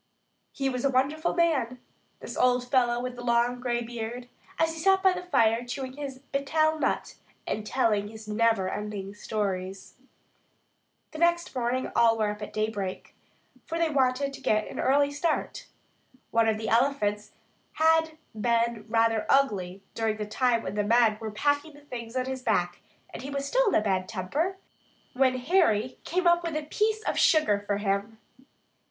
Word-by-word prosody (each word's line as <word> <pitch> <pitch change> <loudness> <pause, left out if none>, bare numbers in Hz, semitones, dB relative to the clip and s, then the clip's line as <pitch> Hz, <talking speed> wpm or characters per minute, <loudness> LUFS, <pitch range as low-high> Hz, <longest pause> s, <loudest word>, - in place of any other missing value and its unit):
He 270 - -2
was 250 -2 -2
a 275 - +3
wonderful 280 +5 0
man, 275 -8 +1 0.4
this - - -7
old 250 0 +2
fellow 240 -2 +3
with 250 0 -4
the 245 - -8
long 240 +1 +1
gray 240 -1 -1
beard, 240 +1 -6 0.3
as 325 0 +1
he 325 - -8
sat 385 +2 +3
by 380 -1 +5
the 360 - -4
fire 230 -10 +2
chewing 260 +1 -5
his 275 -2 -6
"betel" 310 +3 +1
nut - - -1 0.3
and 215 0 -3
telling 210 -5 +1
his 220 0 -11
neverending 210 -2 -1
stories. 195 -3 -4 1.2
The 310 - -8
next 340 0 +2
morning 250 +1 -1
all 230 -1 +4
were 215 -1 +1
up 210 +1 -8
at 210 - -6
daybreak, 210 -3 -3 0.5
for 330 - -3
they 335 -1 +1
wanted 275 0 +1
to - - -10
get 215 0 +1
an - - -7
early 285 +1 +3
start. 305 +3 -2 0.6
One 230 -1 +3
of 215 - 0
the 220 0 -5
elephants 220 -4 +1 0.4
had 320 0 +2 0.2
been 230 0 0
rather 225 -1 +2
ugly 200 -9 +1
during 220 -1 -1
the 210 - -3
time 230 +2 +1
when - - -4
the 210 0 0
men 225 0 +3
were 220 - -4
packing 290 +8 0
the 290 - -15
things 235 -4 -8
on 255 0 0
his 260 0 -4
back, 175 -7 0 0.3
and - - -7
he 270 - -6
was 280 0 -3
still - - +2
in - - +2
a - - +4
bad 190 -3 -1
temper 290 - -2 0.6
when 255 0 +2
Harry 255 - +1
came 365 +2 -1
up 345 0 +5
with 335 -2 -3
a 305 - -1
piece 430 +8 0
of - - -1
sugar 305 -11 +4
for 205 - +1
him. 200 +2 -2
245 Hz, 175 wpm, -27 LUFS, 215-285 Hz, 1.2 s, by